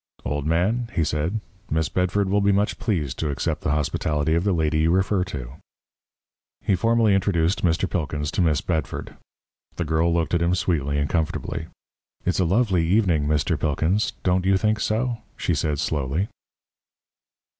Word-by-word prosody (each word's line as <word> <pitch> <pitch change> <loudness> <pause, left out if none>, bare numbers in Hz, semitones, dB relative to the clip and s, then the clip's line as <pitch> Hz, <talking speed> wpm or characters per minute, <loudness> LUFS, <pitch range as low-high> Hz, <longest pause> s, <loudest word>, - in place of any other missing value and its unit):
"Old 75 0 -2
man," 105 +9 +1
he 80 - +2
said, 80 +8 -1 0.3
"Miss 80 0 +1
Bedford 90 +4 0
will 100 +2 +2
be 100 0 +3
much 100 +2 +1
pleased 80 - -1
to 80 - -1
accept 70 - -2
the - - -2
hospitality 75 +1 0
of 85 +1 +2
the 100 - +2
lady 80 -3 +1
you 80 +1 +3
refer 95 +2 +2
to." 65 -5 -7 1.0
He 105 - 0
formally 115 +2 +3
introduced 95 -2 +1
Mr. 85 +2 +2
Pilkins 75 -4 -2
to - - 0
Miss 80 -5 +2
Bedford. 80 -4 -3 0.6
The 85 - -2
girl 80 +2 +2
looked 85 0 0
at 85 - +2
him 85 +2 +2
sweetly 75 -6 0
and 70 0 +1
comfortably. 80 0 -2 0.6
"It's 90 - +1
a 90 - +3
lovely 95 -1 +2
evening, 85 -5 +2
Mr. 75 -2 +1
Pilkins 80 +8 +1
don't 90 0 +2
you 95 +1 +3
think 110 +3 +1
so?" 115 +3 0 0.2
she 85 - 0
said 75 -1 0
slowly. 75 +7 -1
85 Hz, 165 wpm, -24 LUFS, 75-95 Hz, 1.0 s, be